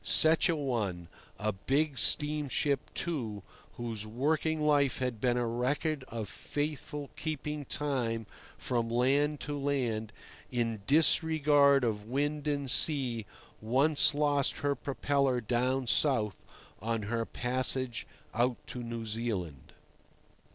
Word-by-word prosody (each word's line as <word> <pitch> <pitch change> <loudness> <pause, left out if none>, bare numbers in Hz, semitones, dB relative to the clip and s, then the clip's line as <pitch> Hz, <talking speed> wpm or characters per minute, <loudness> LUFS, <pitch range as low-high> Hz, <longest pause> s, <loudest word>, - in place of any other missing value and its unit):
Such 160 +3 +6
a 165 - +2
one, 105 - -2 0.3
a 110 +1 -1
big 135 +9 0
steamship, 145 -2 +1
too, 115 - -3 0.3
whose 115 -3 -5
working 155 +8 0
life 145 -3 +3
had 125 -4 -3
been 125 -1 +2
a 120 - 0
record 130 +5 -1
of 110 -2 -5
faithful 145 +3 -4
keeping 150 -1 -4
time 120 -6 -1 0.3
from 120 -2 -1
land 140 +5 +2
to 145 +1 -4
land, 125 -7 -1 0.4
in 115 -3 -1
disregard 145 -2 +4
of 105 -3 -1
wind 145 +4 -1
and 140 -3 0
sea, 125 - +2 0.3
once 140 +6 +3
lost 145 -2 +1
her 140 - +3
propeller 140 -1 0
down 125 +3 0
south, 115 - +1 0.4
on 115 0 -1
her 115 +3 -1
passage 125 0 -1 0.3
out 120 +1 +1
to 125 - -6
New 115 -1 -5
Zealand. 105 - -4
130 Hz, 120 wpm, -31 LUFS, 115-145 Hz, 0.4 s, Such